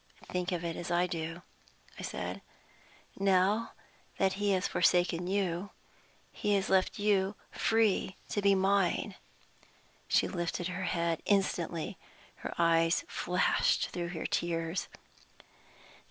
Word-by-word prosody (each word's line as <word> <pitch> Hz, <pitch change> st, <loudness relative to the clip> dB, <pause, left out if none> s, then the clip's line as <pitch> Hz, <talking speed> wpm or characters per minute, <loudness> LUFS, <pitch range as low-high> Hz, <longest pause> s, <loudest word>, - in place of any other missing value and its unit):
"Think 180 Hz, 0 st, -1 dB
of 175 Hz, -1 st, -2 dB
it 165 Hz, -1 st, -2 dB
as 175 Hz, -, -5 dB
I 175 Hz, +1 st, +3 dB
do," 165 Hz, 0 st, -4 dB, 0.6 s
I -, -, -5 dB
said. -, -, -4 dB, 0.8 s
"Now 195 Hz, +3 st, +2 dB, 0.4 s
that 190 Hz, -1 st, +2 dB
he 205 Hz, -, +2 dB
has 185 Hz, 0 st, +1 dB
forsaken 175 Hz, 0 st, +2 dB
you, 190 Hz, -1 st, -1 dB, 0.6 s
he 205 Hz, -1 st, 0 dB
has 195 Hz, -1 st, 0 dB
left 190 Hz, -1 st, +3 dB
you 205 Hz, -1 st, +2 dB, 0.2 s
free 220 Hz, -4 st, +2 dB
to 205 Hz, -, -1 dB
be 200 Hz, 0 st, +5 dB
mine." 195 Hz, +1 st, +2 dB, 0.9 s
She -, -, +3 dB
lifted 175 Hz, -1 st, -2 dB
her 185 Hz, +1 st, -3 dB
head 170 Hz, -2 st, 0 dB
instantly; 175 Hz, -5 st, 0 dB, 0.4 s
her -, -, -6 dB
eyes 165 Hz, 0 st, +3 dB
flashed 180 Hz, +1 st, +1 dB
through 175 Hz, -1 st, -3 dB
her 170 Hz, -2 st, -5 dB
tears. 165 Hz, +1 st, -1 dB
180 Hz, 125 wpm, -31 LUFS, 170-195 Hz, 0.9 s, be